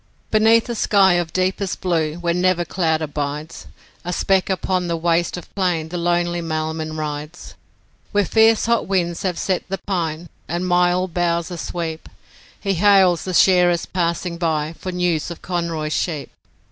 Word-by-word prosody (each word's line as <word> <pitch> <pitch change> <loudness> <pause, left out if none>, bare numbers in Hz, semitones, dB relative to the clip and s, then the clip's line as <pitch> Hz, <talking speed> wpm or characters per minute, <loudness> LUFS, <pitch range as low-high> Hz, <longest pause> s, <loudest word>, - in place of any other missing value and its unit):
Beneath 225 +1 +4
a 240 - -2
sky 200 -4 +4
of 175 -2 0
deepest 185 +1 -1
blue 160 -4 0
where 170 0 -1
never 180 0 +1
cloud 160 -4 0
abides, 150 +1 -5 0.4
A 175 - -3
speck 190 +2 +1
upon 185 -1 -1
the 170 -1 -1
waste 170 +1 0
of 175 - -11
plain 175 -5 -1
the 175 - -4
lonely 175 0 0
mailman 155 -1 -3
rides. 150 +2 -6 0.6
Where 205 -1 +2
fierce 225 +3 +4
hot 235 0 +1
winds 175 -3 0
have 180 -3 -2
set 185 -2 -1
the 195 - -2
pine 170 -3 -2 0.2
and 175 +2 -2
myall 180 +1 +2
boughs 170 0 -1
asweep 165 -1 -5 0.5
He 195 -1 -1
hails 190 -2 +4
the 185 - -3
shearers 180 -2 +4
passing 170 -1 -2
by 160 -2 -1
for 185 +2 -6
news 175 -3 0
of 170 - -9
Conroy's 165 -4 -2
sheep. 155 -5 -2
175 Hz, 160 wpm, -21 LUFS, 165-185 Hz, 0.6 s, Beneath